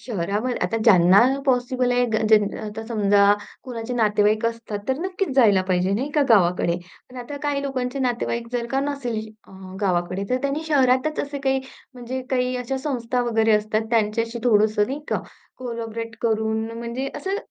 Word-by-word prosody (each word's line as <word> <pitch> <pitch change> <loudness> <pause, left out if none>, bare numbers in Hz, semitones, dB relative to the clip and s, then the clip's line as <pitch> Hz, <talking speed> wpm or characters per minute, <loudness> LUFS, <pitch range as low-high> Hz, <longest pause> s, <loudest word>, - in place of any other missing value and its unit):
शहरावर 210 +3 -2
आता 225 - 0
ज्यांना 185 -2 +6 0.3
पॉसिबल 250 -1 +1
आहे, 245 0 +3
ग 225 - -3
ज्यान 210 -2 +3
आता 215 +1 -6
समजा 205 -3 +3 0.4
कोणाचे 245 -1 -5
नातेवाईक 215 -1 +2
असतात, 230 -2 -4
तर 265 +1 0
नक्कीच 380 +2 -2
जायला 205 -7 +5
पाहिजे, 185 +1 +1
नाही 255 +8 -1
का, 300 - +4
गावाकडे. 180 -5 +3 0.3
पण 255 - -12
आता 285 +4 -7
काही 285 -1 -1
लोकांचे 260 -1 -3
नातेवाईक 240 -2 -1
जर 240 -1 -1
का 270 - +1
नसेल 275 -5 -3 0.3
अ, - - -16 0.3
गावाकडे, 185 0 0
तर 255 - +3
त्यांनी 280 +2 -1
शहरातच 265 +1 +2
असे 285 0 -5
काही, 265 0 +2 0.3
म्हणजे 250 +1 -5
काही 250 -1 0
अशा 250 +2 -3
संस्था 250 -3 -2
वगैरे 225 -1 +3
असतात, 215 +1 -1
त्यांच्याशी 230 +1 0
थोडंसं 210 -2 +3
नाही 275 +5 -4
का - - -1 0.4
कोलॅबोरेट 230 -2 -5
करून, 220 -1 0
म्हणजे 235 +3 -4
असं 385 +1 -2
235 Hz, 165 wpm, -23 LUFS, 215-260 Hz, 0.4 s, ज्यांना